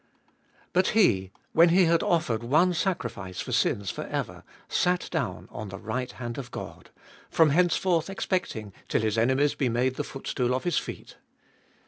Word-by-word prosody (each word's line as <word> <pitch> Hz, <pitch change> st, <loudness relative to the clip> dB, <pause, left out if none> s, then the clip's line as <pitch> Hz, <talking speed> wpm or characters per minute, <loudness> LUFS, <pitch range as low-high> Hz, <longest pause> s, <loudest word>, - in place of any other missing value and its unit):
But 185 Hz, +1 st, +3 dB
He, 95 Hz, -, +3 dB, 0.2 s
when 170 Hz, +1 st, +6 dB
He 180 Hz, +2 st, +5 dB
had 165 Hz, 0 st, +3 dB
offered 125 Hz, -10 st, +1 dB
one 155 Hz, +10 st, +3 dB
sacrifice 115 Hz, -, -3 dB
for -, -, -4 dB
sins 100 Hz, -1 st, +1 dB
for -, -, -6 dB
ever, -, -, -4 dB, 0.2 s
sat 180 Hz, 0 st, +1 dB
down 125 Hz, -, -3 dB
on 100 Hz, 0 st, -6 dB
the 95 Hz, -, -7 dB
right 125 Hz, +5 st, -3 dB
hand 120 Hz, +1 st, -5 dB
of 125 Hz, -2 st, -7 dB
God; 90 Hz, -5 st, -8 dB, 0.4 s
from 160 Hz, -3 st, +4 dB
henceforth 175 Hz, +1 st, +2 dB
expecting 180 Hz, -, -2 dB
till -, -, +1 dB
His 110 Hz, -1 st, +1 dB
enemies 130 Hz, +5 st, +3 dB
be 135 Hz, -4 st, 0 dB
made 125 Hz, +2 st, 0 dB
the 145 Hz, -, -1 dB
footstool 125 Hz, -3 st, -2 dB
of 130 Hz, -, -3 dB
His 175 Hz, -3 st, +1 dB
feet. -, -, -9 dB
130 Hz, 165 wpm, -27 LUFS, 110-170 Hz, 0.4 s, when